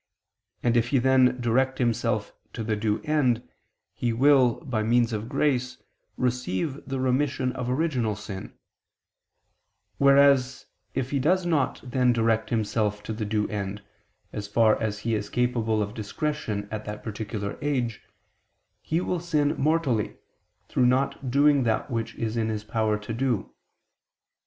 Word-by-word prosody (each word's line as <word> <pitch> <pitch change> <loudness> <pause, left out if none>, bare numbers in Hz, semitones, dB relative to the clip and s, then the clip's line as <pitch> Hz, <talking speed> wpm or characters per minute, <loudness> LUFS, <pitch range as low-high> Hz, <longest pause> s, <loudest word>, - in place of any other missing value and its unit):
And 120 -1 +2
if 120 0 +3
he 135 - +2
then 130 0 +4
direct 130 +3 +1
himself 115 -3 0 0.2
to 115 - -4
the 110 0 0
due 105 0 -1
end, 135 -7 +1 0.5
he 120 - -1
will, 130 -1 +5
by 120 -5 -1
means 115 +1 +2
of 110 +2 -4
grace, 135 -3 0 0.4
receive 125 - -1
the 135 -1 -3
remission 130 0 +1
of 125 -1 -4
original 130 -6 0
sin: 100 -2 -7 1.5
whereas 140 -1 +4 0.3
if 130 -1 -2
he 140 - +1
does 180 +7 +2
not 155 -6 0
then 125 -1 +2
direct 115 -1 +1
himself 105 -2 -1
to 110 - -4
the 110 0 -3
due 105 0 0
end, 100 -1 -4 0.5
as 105 -1 -4
far 110 +1 +3
as 105 -2 -1
he 115 +2 -2
is 105 -1 -2
capable 115 -3 +1
of 105 +1 -6
discretion 110 -1 -3
at 110 -1 -5
that 105 0 -6
particular 105 -2 -5
age, 125 -6 -1 0.8
he 165 +2 -1
will 180 -1 -1
sin 150 -4 +1
mortally, 145 -8 0 0.5
through 125 - +2
not 130 +1 0
doing 140 +2 +4
that 115 -1 0
which 115 -1 -3
is 115 -1 -3
in 110 -1 0
his 105 -1 -3
power 110 0 0
to 105 +2 -6
do. 120 -2 -1
120 Hz, 150 wpm, -26 LUFS, 110-135 Hz, 1.5 s, will